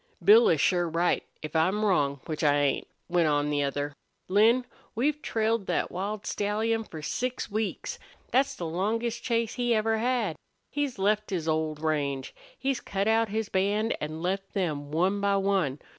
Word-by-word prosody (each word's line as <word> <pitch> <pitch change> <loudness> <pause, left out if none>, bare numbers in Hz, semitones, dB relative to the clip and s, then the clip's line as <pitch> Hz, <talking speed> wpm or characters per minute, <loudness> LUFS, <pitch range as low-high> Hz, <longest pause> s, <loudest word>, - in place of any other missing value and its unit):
"Bill 445 +2 +7
is - - +3
sure 175 -2 +2
right, 170 +2 +1 0.2
if 155 - -6
I'm 190 +7 +2
wrong, 140 -8 +1
which 155 -2 -4
I 145 -1 +4
ain't," 145 -2 +1 0.2
went 175 -2 +2
on 145 0 +1
the 145 -1 +1
other. 145 +1 -2 0.3
"Lin, 225 +6 +4 0.3
we've 295 +6 0
trailed 225 -4 0
thet - - 0
wild 200 +3 -4
stallion 220 +2 0
for 160 -7 -9
six 250 +5 -3
weeks. 215 0 -3 0.3
Thet's 270 +2 +2
the 175 - -5
longest 220 +8 -1
chase 230 -2 0
he 240 -2 +1
ever 220 +1 +1
had. 235 -7 0 0.3
He's 290 -4 -2
left 210 +2 +1
his 170 -4 -2
old 155 -1 -1
range. 140 -4 -1 0.2
He's 270 -2 -1
cut 195 +1 -2
out 225 0 +3
his 220 +1 -2
band, 205 +4 +1
an' 155 +2 -4
left 195 +3 -2
them, 150 -7 -1
one 185 +6 +1
by 200 0 +2
one. 195 -8 +1
195 Hz, 175 wpm, -28 LUFS, 160-225 Hz, 0.3 s, Bill